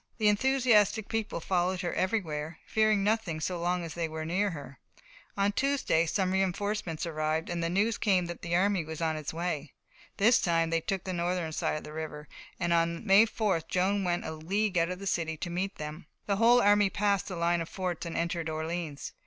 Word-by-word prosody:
The 215 -3 +4
enthusiastic 225 -2 +3
people 225 -5 -2
followed 180 +1 0
her 175 - -2
everywhere, 165 -6 -2
fearing 215 -2 +2
nothing 205 -6 0
so 175 +3 -2
long 175 0 0
as 165 - -6
they 170 -1 -2
were 155 0 -5
near 190 +5 +1
her. 145 -5 -9 0.6
On 200 +1 +2
Tuesday 260 -10 +1
some 185 +2 0
reinforcements 190 -2 -1
arrived, 155 0 -1
and 170 -1 -2
news 195 +7 +1
came 190 -4 +2
that 175 -1 -7
the 170 0 -1
army 190 -1 +2
was 160 0 -7
on 160 -1 0
its 155 -2 -4
way. 160 -4 -3 0.4
This 225 +5 +5
time 165 -1 +1
they 165 0 +1
took 190 +2 -2
the 185 - -4
northern 175 -1 -1
side 155 - -1
of - - -7
the 150 - -9
river, 155 -1 -6 0.3
and 170 -2 +1
on 170 +2 +1
May 205 +2 +6
4th 200 -7 -1
Joan 195 +2 +1
went 175 -1 -1
a - - -3
league 195 +6 -1
out 165 +1 +1
of 180 - -4
the 195 - -8
city 165 -4 -1
to 175 - -5
meet 190 +3 -2
them. 150 +1 -7 0.2
The 200 -1 0
whole 235 +3 +6
army 205 0 +5
passed 200 -1 0
the 185 - -5
line 170 0 +1
of 165 - -5
forts 180 -3 -3
and 170 -1 -4
entered 170 -1 -1
Orleans. 160 -1 -4
175 Hz, 205 wpm, -29 LUFS, 165-200 Hz, 0.6 s, May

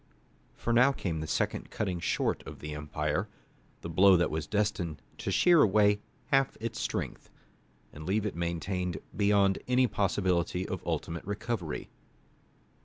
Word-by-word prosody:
For 115 - -1
now 125 +4 +6
came 85 - -3
the 80 - -4
second - - -1
cutting 95 -4 -2
short - - 0
of - - -8
the 75 0 -6
empire, 75 +5 -2 0.5
the 85 - -6
blow 95 +2 +6
that 85 - +1
was 75 -1 -3
destined 100 -7 -1 0.2
to - - -3
shear 175 -3 +5
away 105 0 +4 0.3
half 135 -1 +3
its 115 0 -4
strength, - - -3 0.6
and 75 - -9
leave 100 +5 0
it 105 - -2
maimed 85 +1 -2 0.2
beyond 100 0 +3
any 125 +1 +4
possibility 95 -4 0
of - - -4
ultimate 85 0 -2
recovery. 100 -4 -4
95 Hz, 145 wpm, -30 LUFS, 85-105 Hz, 0.6 s, now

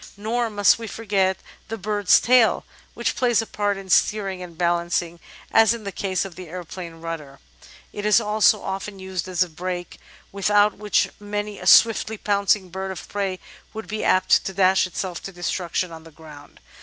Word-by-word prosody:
Nor 230 +3 -1
must 205 +1 +3
we 225 - -6
forget 195 -4 0 0.3
the 225 - -5
bird's 205 -1 +3
tail, 245 -2 +3 0.3
which - - -1
plays 240 -3 +2
a 225 - 0
part 205 -2 -1
in 195 -1 -9
steering 195 0 +1
and 170 -2 -10
balancing 170 0 0 0.3
as 225 +1 +5
in 230 - -10
the 200 - -5
case 190 0 -2
of 195 - -8
the 180 -2 -10
aeroplane 175 0 -8
rudder; 165 -4 -7 0.6
it 205 - -6
is 210 +2 +5
also 215 -1 +2
often 195 +1 -5
used 190 -1 -5
as 185 0 +1
a - - -6
brake, 175 +2 -6 0.3
without 205 +1 +2
which 210 0 +1
many 205 0 -4
a - - -6
swiftly 220 -1 +5
pouncing 200 -2 +1
bird 190 +1 -4
of 190 -3 -7
prey 195 -2 -2 0.4
would 220 -3 -6
be 215 +3 -4
apt 185 - +3
to 195 - -5
dash 190 -1 +3
itself 180 -1 -5
to 195 - -7
destruction 175 0 -3
on 160 -1 -10
the 165 - -13
ground. 150 -2 -14
195 Hz, 180 wpm, -23 LUFS, 180-210 Hz, 0.6 s, as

